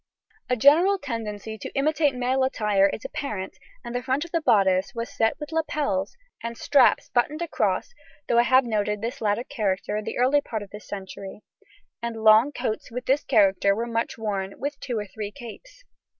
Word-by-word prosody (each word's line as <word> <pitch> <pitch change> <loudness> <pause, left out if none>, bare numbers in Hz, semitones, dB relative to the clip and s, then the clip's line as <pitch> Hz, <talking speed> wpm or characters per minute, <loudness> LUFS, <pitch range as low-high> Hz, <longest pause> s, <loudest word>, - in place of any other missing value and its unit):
A 250 - +3
general 315 - +5
tendency 220 - -5
to - - -6
imitate 295 0 +2
male 255 +1 +1
attire 210 -6 +2
is 210 - -6
apparent, 210 -9 -5 0.3
and 240 - -6
the 245 - -1
front 265 +5 -1
of 340 - -13
the 335 - 0
bodice 195 - +2
was 230 0 -5
set 225 +4 +1
with 295 0 -7
lapels 290 - -1 0.2
and 230 0 -5
straps 280 -3 +3
buttoned 295 +7 0
across 340 +7 -1 0.3
(though 235 - +3
I 240 - +3
have 260 0 +5
noted 210 -2 -1
this 240 +4 -4
latter 210 +2 +1
character 210 -7 -2
in 215 - -3
the - - -4
early 265 +4 +3
part 220 -6 -5
of 200 - -14
this 210 - -10
century), 195 0 -8 0.6
and 230 -2 -4
long 220 +5 +6
coats 245 -6 -3
with 250 +2 -6
this 275 +2 +2
character 200 -4 +3
were 230 +2 -2
much 230 -1 -2
worn, 200 -3 -3
with 285 0 -4
two 245 -4 -3
or 210 - -3
three 205 +1 -6
capes. 285 - -12
235 Hz, 190 wpm, -25 LUFS, 210-275 Hz, 0.6 s, long